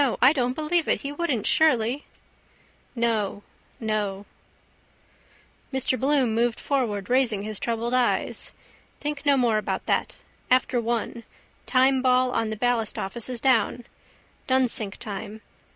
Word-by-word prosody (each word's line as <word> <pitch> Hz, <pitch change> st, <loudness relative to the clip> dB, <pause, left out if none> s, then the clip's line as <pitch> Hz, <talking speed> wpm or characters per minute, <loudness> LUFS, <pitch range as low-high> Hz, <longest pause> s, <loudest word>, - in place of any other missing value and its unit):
I 260 Hz, +4 st, +6 dB
don't 250 Hz, -4 st, 0 dB
believe 315 Hz, +2 st, +1 dB
it. -, -, +1 dB
He 280 Hz, -, -4 dB
wouldn't 290 Hz, -8 st, -2 dB
surely? 260 Hz, -3 st, +2 dB, 0.9 s
No, 220 Hz, -4 st, 0 dB, 0.4 s
no. 210 Hz, -3 st, -2 dB, 1.5 s
Mr 265 Hz, -1 st, 0 dB
Bloom 270 Hz, -4 st, +2 dB
moved 235 Hz, +1 st, +1 dB
forward, 220 Hz, -8 st, -1 dB
raising 245 Hz, -5 st, +1 dB
his 215 Hz, -1 st, -3 dB
troubled 235 Hz, +1 st, -2 dB
eyes. 250 Hz, -1 st, 0 dB, 0.5 s
Think 295 Hz, 0 st, -4 dB
no 280 Hz, -1 st, +5 dB
more 235 Hz, -4 st, +2 dB
about -, -, -3 dB
that. -, -, 0 dB, 0.3 s
After 255 Hz, -1 st, +2 dB
one. 235 Hz, 0 st, -2 dB, 0.4 s
Timeball 255 Hz, -1 st, +3 dB
on 225 Hz, -, 0 dB
the 220 Hz, -, -4 dB
ballastoffice 230 Hz, -1 st, -1 dB
is 250 Hz, -2 st, -2 dB
down. 250 Hz, -1 st, +2 dB, 0.6 s
Dunsink 250 Hz, -6 st, +2 dB
time. 210 Hz, +1 st, -7 dB
245 Hz, 120 wpm, -25 LUFS, 220-265 Hz, 1.5 s, I